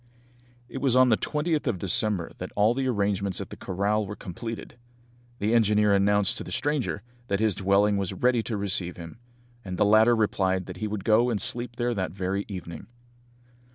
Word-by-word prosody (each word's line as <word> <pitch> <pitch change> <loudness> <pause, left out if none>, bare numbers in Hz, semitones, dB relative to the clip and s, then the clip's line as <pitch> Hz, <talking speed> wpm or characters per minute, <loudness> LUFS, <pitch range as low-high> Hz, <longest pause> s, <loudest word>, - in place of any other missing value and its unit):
It 135 - -6
was 130 -3 +2
on 130 0 +6
the 110 - +5
20th 150 +5 -1
of - - 0
December 95 -1 0
that - - -6
all 105 +3 +4
the 130 +1 -1
arrangements 100 -4 0
at - - -7
the - - -6
corral 100 +3 -1
were 105 - -6
completed. 115 +5 -7 0.6
The 110 +1 0
engineer 105 -2 +4
announced 100 0 +2
to - - -5
the - - -9
stranger 145 -8 -1 0.2
that 100 -3 0
his 110 -2 +2
dwelling 100 +2 +2
was 95 -1 -2
ready 120 +5 +2
to 110 -1 -3
receive 95 -3 -1
him, 85 +5 -10 0.4
and 90 -2 -5
the - - +3
latter 110 +3 +5
replied 95 -4 0
that 90 - -8
he 110 - -3
would 105 -2 -4
go 115 +3 +3
and 110 -4 -1
sleep 120 +4 -1
there 120 0 -1
that 95 -6 -3
very 95 +1 -2
evening. 85 -5 -8
105 Hz, 190 wpm, -26 LUFS, 95-115 Hz, 0.6 s, on